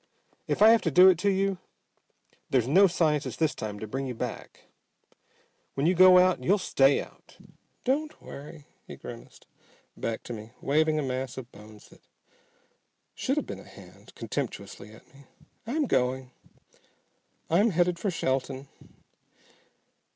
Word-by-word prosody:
If -, -, +2 dB
I 220 Hz, -, +9 dB
have 230 Hz, -1 st, +5 dB
to 165 Hz, -, 0 dB
do 180 Hz, +6 st, +7 dB
it 180 Hz, -4 st, +3 dB
to 200 Hz, +2 st, +1 dB
you, 195 Hz, -1 st, 0 dB, 0.9 s
there's 125 Hz, -3 st, +1 dB
no 190 Hz, +8 st, +6 dB
scientist 155 Hz, -4 st, 0 dB
this 160 Hz, -3 st, +1 dB
time 105 Hz, -1 st, -6 dB
to 110 Hz, -, -5 dB
bring 135 Hz, +5 st, -4 dB
you 125 Hz, -, -5 dB
back. -, -, -7 dB, 1.1 s
When 135 Hz, -, -1 dB
you 175 Hz, -, +4 dB
go 185 Hz, 0 st, +7 dB
out 185 Hz, 0 st, +3 dB
you'll 200 Hz, +3 st, +3 dB
stay 140 Hz, -7 st, +3 dB
out!" -, -, -12 dB, 0.5 s
"Don't 300 Hz, +4 st, -1 dB
worry," 145 Hz, +1 st, -11 dB, 0.2 s
he -, -, -9 dB
grimaced -, -, -12 dB, 0.5 s
back 115 Hz, -1 st, -4 dB
to 120 Hz, -, -7 dB
me, 110 Hz, +1 st, -10 dB
waving 155 Hz, +2 st, +1 dB
a 150 Hz, -, 0 dB
mass 130 Hz, -1 st, -4 dB
of 130 Hz, -2 st, -8 dB
bones 105 Hz, 0 st, -15 dB
that -, -, -19 dB, 1.1 s
should -, -, -2 dB
have -, -, -1 dB
been -, -, -7 dB
a -, -, -12 dB
hand -, -, -16 dB
contemptuously 105 Hz, -, -6 dB
at 110 Hz, -, -17 dB
me, 140 Hz, 0 st, -18 dB, 0.4 s
"I'm 295 Hz, +5 st, 0 dB
going. 130 Hz, -, -1 dB, 1.2 s
I'm 200 Hz, +8 st, +3 dB
headed 175 Hz, -1 st, +1 dB
for 205 Hz, -, -1 dB
Shelton." 135 Hz, -4 st, -2 dB
150 Hz, 150 wpm, -27 LUFS, 130-185 Hz, 1.2 s, I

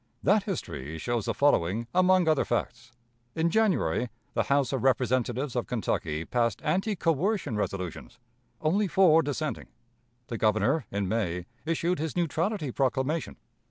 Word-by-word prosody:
That 205 Hz, +6 st, +4 dB
history 80 Hz, -, -5 dB
shows 120 Hz, +5 st, -2 dB
the -, -, 0 dB
following 115 Hz, -6 st, +2 dB
among 185 Hz, -1 st, +4 dB
other 155 Hz, -3 st, +3 dB
facts: 120 Hz, 0 st, -3 dB, 0.4 s
In 165 Hz, +1 st, +1 dB
January, 160 Hz, -, +1 dB, 0.2 s
the -, -, 0 dB
House 140 Hz, -2 st, +1 dB
of 130 Hz, -, -1 dB
Representatives 130 Hz, 0 st, +1 dB
of 120 Hz, -, -1 dB
Kentucky 80 Hz, -9 st, -2 dB
passed 115 Hz, -3 st, 0 dB
anti 195 Hz, +7 st, 0 dB
coercion 165 Hz, -, 0 dB
resolutions 100 Hz, +1 st, -4 dB, 0.4 s
only 195 Hz, +7 st, +2 dB
four 170 Hz, -3 st, +5 dB
dissenting. 150 Hz, +1 st, -3 dB, 0.6 s
The 115 Hz, -2 st, -5 dB
Governor, 110 Hz, +6 st, +2 dB
in 100 Hz, -1 st, -2 dB
May, 90 Hz, -5 st, -1 dB, 0.2 s
issued 165 Hz, +1 st, 0 dB
his 160 Hz, -1 st, -3 dB
neutrality 170 Hz, -, -1 dB
proclamation. 135 Hz, +4 st, -1 dB
135 Hz, 135 wpm, -28 LUFS, 115-165 Hz, 0.6 s, four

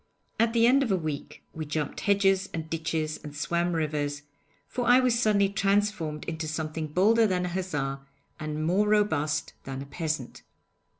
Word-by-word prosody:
At 230 Hz, 0 st, +3 dB
the 230 Hz, -1 st, +4 dB
end 265 Hz, +3 st, +5 dB
of 250 Hz, -6 st, 0 dB
a -, -, +4 dB
week 155 Hz, -5 st, -5 dB
we 160 Hz, -, -4 dB
jumped 150 Hz, -1 st, -3 dB
hedges 195 Hz, -1 st, +2 dB
and 160 Hz, -1 st, -4 dB
ditches 160 Hz, -1 st, -2 dB
and 145 Hz, -1 st, -8 dB
swam 170 Hz, +4 st, 0 dB
rivers, 150 Hz, -2 st, -2 dB, 0.4 s
for 245 Hz, -2 st, -3 dB
I 245 Hz, +1 st, +7 dB
was 250 Hz, -2 st, +2 dB
suddenly 205 Hz, -4 st, +3 dB
transformed 200 Hz, -6 st, 0 dB
into 160 Hz, -1 st, -4 dB
something 155 Hz, 0 st, -3 dB
bolder 215 Hz, +8 st, +4 dB
than 180 Hz, -2 st, 0 dB
a -, -, -2 dB
hussar, 150 Hz, -7 st, -2 dB, 0.4 s
and 155 Hz, 0 st, -3 dB
more 190 Hz, +5 st, +2 dB
robust 160 Hz, -8 st, +1 dB
than 135 Hz, 0 st, -5 dB
a 135 Hz, -, -6 dB
peasant.' 150 Hz, -3 st, -4 dB
165 Hz, 170 wpm, -27 LUFS, 150-205 Hz, 0.4 s, I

